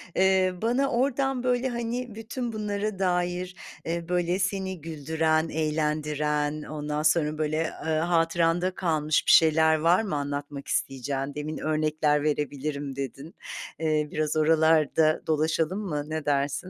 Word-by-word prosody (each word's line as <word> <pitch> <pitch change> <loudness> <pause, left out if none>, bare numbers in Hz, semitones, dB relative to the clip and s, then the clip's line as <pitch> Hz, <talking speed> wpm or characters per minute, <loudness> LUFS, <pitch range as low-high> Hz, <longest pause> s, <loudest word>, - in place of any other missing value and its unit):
Eee, 190 -1 +3
bana 255 +5 +1
oradan 270 +1 0
böyle 250 +1 +1
hani, 235 -1 -4
bütün 230 +1 -5
bunlara 210 -1 -3
dair, 180 0 -1 0.3
eee, 170 0 -2
böyle 180 +1 +1
seni 190 -2 -2
güldüren, 160 +1 0
eğlendiren, 150 -1 -1
ondan 150 0 -3
sonra 155 -1 +2
böyle, 155 +1 0 0.2
ııı, 155 -1 +1
hatıranda 170 +1 +1
kalmış 155 -4 +1
bir - - +5
şeyler 160 0 +6
var 170 +6 +4
mı 190 -8 -2
anlatmak 145 0 -4
isteyeceğin? 135 +1 -2
Demin 150 +1 -4
örnekler 155 -1 +1
verebilirim 145 -2 -2
dedin. 140 +3 -6 0.4
Eee, 155 -2 +1
biraz 155 0 -1
oralarda 155 0 +3
dolaşalım 160 +4 +1
mı? 150 -8 -3
Ne 155 -1 -3
dersin? 140 0 +1
160 Hz, 130 wpm, -26 LUFS, 150-185 Hz, 0.4 s, şeyler